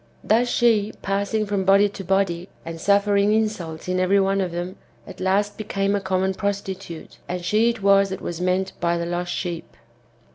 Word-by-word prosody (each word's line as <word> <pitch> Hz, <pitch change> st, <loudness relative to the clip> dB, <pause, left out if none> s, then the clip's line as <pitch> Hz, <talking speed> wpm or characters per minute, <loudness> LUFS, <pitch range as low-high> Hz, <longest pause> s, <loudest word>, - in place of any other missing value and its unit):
Thus 235 Hz, +3 st, +3 dB
she, 220 Hz, -4 st, +2 dB
passing 200 Hz, +2 st, 0 dB
from 200 Hz, -2 st, -1 dB
body 195 Hz, +2 st, +5 dB
to 195 Hz, -, -8 dB
body, 185 Hz, -1 st, 0 dB, 0.2 s
and 165 Hz, 0 st, -7 dB
suffering 200 Hz, +1 st, +3 dB
insults 200 Hz, -8 st, -2 dB
in 185 Hz, 0 st, 0 dB
every 190 Hz, +2 st, +3 dB
one 195 Hz, 0 st, +1 dB
of 185 Hz, -2 st, -2 dB
them, 175 Hz, +2 st, -5 dB, 0.3 s
at -, -, -11 dB
last 200 Hz, +3 st, 0 dB
became 200 Hz, -1 st, -1 dB
a 200 Hz, -, -1 dB
common 190 Hz, 0 st, 0 dB
prostitute; 195 Hz, -4 st, -5 dB
and 180 Hz, 0 st, -4 dB
she 220 Hz, +4 st, +3 dB
it 230 Hz, -4 st, -4 dB
was 195 Hz, 0 st, +5 dB
that 190 Hz, -, -5 dB
was 175 Hz, 0 st, -5 dB
meant 185 Hz, +1 st, 0 dB
by 170 Hz, 0 st, +1 dB
the 170 Hz, -, -2 dB
lost 175 Hz, +1 st, -3 dB
sheep. 170 Hz, -2 st, -5 dB
195 Hz, 185 wpm, -23 LUFS, 180-200 Hz, 0.3 s, body